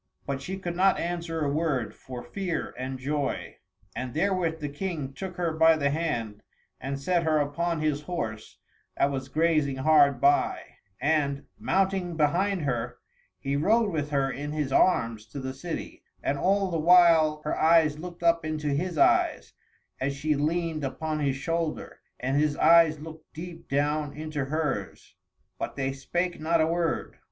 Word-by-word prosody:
But 135 -1 -3
she 190 +7 -5
could 175 -2 -4
not 190 +2 +4
answer 170 -1 -3
a 140 - 0
word, 145 -6 -1
for 125 -2 -9
fear 190 -4 -3
and 130 +1 -4
joy. 140 +2 -3 0.4
And 130 +1 -5
therewith 175 -2 0
the 150 - -3
King 145 -2 -4
took 185 +3 -6
her 170 -2 0
by 160 0 +5
the 140 -2 +1
hand, 120 -10 -2 0.4
and 135 +2 -4
set 175 +5 +1
her 160 -2 +2
upon 155 +3 -1
his 150 -2 0
horse 115 -11 -5 0.4
that 140 - +2
was 135 -1 -4
grazing 155 -3 +2
hard 140 -1 +4
by; 140 +3 +3 0.4
and, 140 0 0
mounting 190 -3 0
behind 175 +4 +1
her, 120 -3 -2 0.4
he 140 0 -2
rode 210 +8 +3
with 150 -3 -2
her 135 -2 +1
in 145 +2 -5
his 150 -3 -2
arms 115 -11 +2
to 140 - -7
the 130 0 -4
city, 165 +5 -6 0.2
and 140 - 0
all 195 0 +2
the 165 - 0
while 165 -2 +6
her 150 - -1
eyes 160 -2 +4
looked 175 0 -8
up 170 -1 +3
into 155 -1 -2
his 165 +4 -1
eyes, - - +2 0.5
as 140 +1 -1
she 155 +2 0
leaned 160 +1 -1
upon 155 +3 -3
his 140 -3 0
shoulder, 165 +2 -3 0.2
and 130 +3 0
his 150 0 +1
eyes 165 -2 +5
looked 160 +1 -11
deep 165 +1 -9
down 145 +1 0
into 155 -2 -4
hers 140 - -3 0.5
but - - -4
they 135 -1 -1
spake 175 +6 -2
not 165 +2 +1
a 155 - +4
word. 165 0 -1
155 Hz, 165 wpm, -27 LUFS, 140-170 Hz, 0.5 s, while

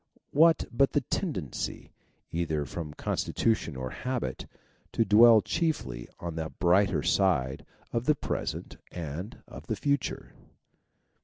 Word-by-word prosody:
What 160 +1 +5
but 135 +3 +3
the 145 - +3
tendency, 130 - -3 0.4
either 80 -3 -1
from 75 -1 -6
constitution 110 -9 0
or 65 -1 -4
habit, 125 -1 -3 0.5
to 115 - +2
dwell 110 +2 +8
chiefly 65 - -2
on 85 -1 -4
the 80 0 -2
brighter 90 +3 +2
side 70 -10 +1 0.2
both 115 - 0
of - - -13
the 150 - +5
present - - -4 0.2
and 85 - -6
of - - -11
the 110 - -1
future 140 +7 -1
100 Hz, 130 wpm, -29 LUFS, 80-125 Hz, 0.5 s, dwell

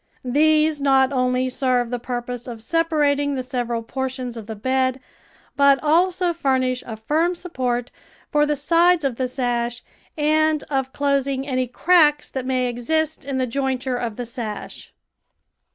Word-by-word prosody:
These 305 +3 +3
not 270 -1 +4
only 255 0 +1
serve 250 -2 0
the 245 - -2
purpose 245 0 -5
of 240 -2 -6
sepa 330 +8 0
rating 285 0 +2
the 260 - -3
several 240 -2 -3
portions 255 0 -4
of 220 -3 -8
the 220 - -5
bed, 260 +3 0 0.6
but 280 -1 +5
also 350 +3 +2
fur 275 -6 +1
nish 255 -1 -1
a 225 -2 -6
firm 315 +10 0
support 250 -8 -3 0.4
for 295 0 +3
the 295 - +1
sides 335 +3 +3
of 255 -4 -1
the 255 - -1
sash 245 -2 -2 0.3
and 310 0 +2
of 265 -1 -1
closing 275 -1 0
any 255 -2 -1
cracks 295 +2 +3
that 260 -1 -4
may 255 -1 +1
exist 305 +6 -1
in 275 -1 -3
the 260 - +1
joint 260 +1 -2
ure 255 -1 -1
of 235 -3 -4
the 245 - -5
sash. 230 -3 -6
265 Hz, 165 wpm, -22 LUFS, 245-295 Hz, 0.6 s, but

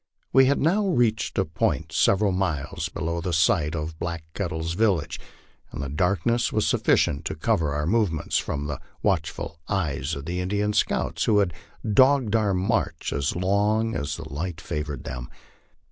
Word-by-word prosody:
We 135 0 +7
had 140 - +2
now 195 +7 +2
reached 120 - +1
a 95 - +2
point 75 - -1
several 100 +1 +3
miles 80 -7 -2
below 85 +2 -3
the 90 0 -2
site 80 -1 +2
of 80 0 -4
Black 85 -2 -3
Kettle's 85 -4 -2
village, 95 -6 +1 0.5
and - - -7
the 70 - -4
darkness 95 - +1
was 110 - +1
sufficient 70 - +2
to - - -2
cover 75 -4 +1
our 75 0 -1
movements 90 -5 +1
from 70 0 -3
the 75 -2 -4 0.2
watchful 80 -4 -1
eyes 80 -6 -1
of 70 - -7
the 90 +2 -3
Indian 105 +3 0
scouts, - - 0
who 110 - +3
had 100 -4 +2 0.3
dogged 130 +1 +4
our 105 -3 +2
march 90 +2 -1
as 70 -1 -1
long 105 +5 +1
as 75 +1 -2
the 80 -1 -7
light 85 +3 -4
favored 75 -5 -4
them. 60 0 -6
90 Hz, 165 wpm, -25 LUFS, 75-105 Hz, 0.5 s, We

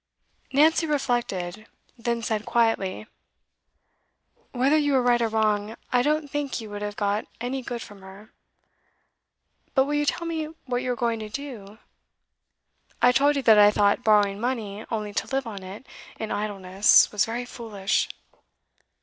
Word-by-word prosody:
Nancy 320 +4 +4
reflected, 235 - -2 0.3
then 235 -1 -2
said 220 -2 -1
quietly: 225 -4 0 1.5
'Whether 265 +4 +2
you 290 -2 +2
are 260 - +4
right 240 -1 +3
or 230 - +2
wrong, 215 -1 0 0.2
I 245 - +4
don't 300 +2 0
think 285 -2 -3
you 220 -2 -9
would 205 0 -6
have 205 0 -4
got 205 +1 -1
any 250 +3 -3
good 240 -2 -5
from 205 -1 -13
her. 195 +3 -14 1.4
But 265 -1 +4
will 290 - -3
you 295 0 0
tell 335 - -1
me 325 -2 -2 0.2
what 245 -1 -1
you 255 -1 -2
are - - -1
going 235 -1 -1
to 215 -1 -6
do? 220 -5 -8 1.2
I 245 - +5
told 285 +3 +3
you 275 - -1
that 220 -3 +6
I 205 0 +8
thought 205 +3 +2
borrowing 205 -2 +3
money 220 -4 -3
only 210 -2 -3
to - - -2
live 270 -1 -2
on 205 -4 -7
it 190 +7 -10 0.3
in 220 - -4
idleness 200 -1 +3
was 210 - +2
very 235 +2 -4
foolish. 215 -5 -2
230 Hz, 160 wpm, -25 LUFS, 205-260 Hz, 1.5 s, I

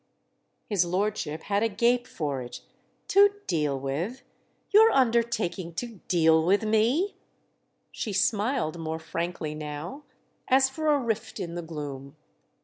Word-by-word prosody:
His 200 -5 +2
lordship 180 -3 -2
had 200 0 0
a 225 - +2
gape 240 +4 +2
for 145 -5 -3
it. 120 - -8 0.5
"'To 405 +1 +5
deal 150 -6 0
with'? 155 - -3 0.5
You're 440 +2 +7
undertaking 230 - +1
to 230 -2 -5
'deal' 160 -2 +4
with 200 +6 +3
me?" 235 - +2 0.7
She 215 - -4
smiled 205 - 0
more 160 0 -3
frankly 165 -1 -4
now, 155 - -6 0.5
as 265 0 +4
for 310 +3 -3
a 300 -1 +5
rift 230 -4 -3
in 170 -1 -4
the 175 - -4
gloom. 145 -4 -7
195 Hz, 135 wpm, -27 LUFS, 160-235 Hz, 0.7 s, You're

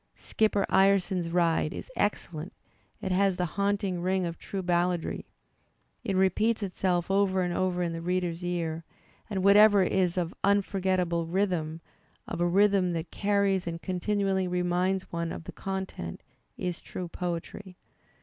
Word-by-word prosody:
"Skipper 210 -2 +1
Ireson's 190 -2 +3
Ride" 165 -2 +1
is - - -8
excellent; 175 -4 -2 0.5
it 190 - -2
has 190 0 +2
the 180 - 0
haunting 200 -2 0
ring 185 0 +1
of 170 -1 -5
true 195 -1 -5
balladry; 175 -1 0 0.8
it 200 -6 -1
repeats 210 +4 +2
itself 180 -1 -1
over 195 -1 +2
and 175 -1 -1
over 180 0 0
in 170 -1 -2
the 165 - -5
reader's 180 -1 -1
ears; 165 -2 -2 0.5
and 190 -3 -2
whatever 205 0 +7
is 185 -1 +1
of 175 -1 -1
unforgettable 185 -4 +1
rhythm, 170 -3 -1 0.5
of 170 - -4
a 175 - +3
rhythm 195 -1 +3
that 165 0 -4
carries 200 -2 +1
and 165 0 -5
continually 190 0 0
reminds 180 +1 0
one 170 -1 -2
of - - -6
the - - -8
content, 190 - -5 0.3
is 180 -2 -3
true 180 - -6
poetry. 180 +2 -5
185 Hz, 145 wpm, -28 LUFS, 175-195 Hz, 0.8 s, whatever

